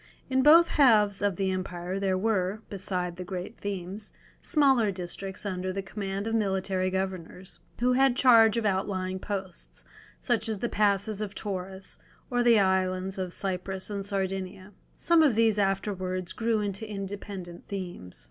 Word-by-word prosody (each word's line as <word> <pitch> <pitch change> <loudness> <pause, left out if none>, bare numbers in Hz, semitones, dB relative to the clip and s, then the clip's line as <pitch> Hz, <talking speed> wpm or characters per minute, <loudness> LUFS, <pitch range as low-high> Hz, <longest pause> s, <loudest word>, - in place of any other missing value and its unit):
In 260 0 +3
both 325 +5 +7
halves 210 -10 +4
of 200 -2 +1
the 190 +1 0
empire 185 0 -3
there 190 -1 +1
were, 205 0 0
beside 180 -3 -3
the 180 - -5
great 185 +4 -6
themes, 200 +1 -5 0.3
smaller 270 -8 +3
districts 190 +1 -6
under 185 -1 -2
the 195 +1 -4
command 195 0 -4
of 225 - -2
military 190 -3 0
governors, 185 -1 -5 0.2
who 250 +1 +3
had 265 -1 +4
charge 230 -4 +6
of 230 - -1
outlying 190 -1 -1
posts, 190 -3 -6 0.3
such 225 -3 0
as 220 - -1
the 235 +4 -2
passes 205 0 +1
of 210 -1 -4
Taurus, 190 -1 -6 0.3
or 245 0 +2
the 235 -2 +5
islands 190 0 +1
of 185 -1 -3
Cyprus 190 +1 -3
and 200 -1 -3
Sardinia. 195 -1 -3 0.3
Some 340 -1 +4
of 285 -8 +4
these 225 -2 +3
afterwards 185 -2 -1
grew 225 -2 0
into 205 +1 -4
independent 195 -3 -7
themes. 175 - -7
195 Hz, 155 wpm, -28 LUFS, 185-215 Hz, 0.3 s, both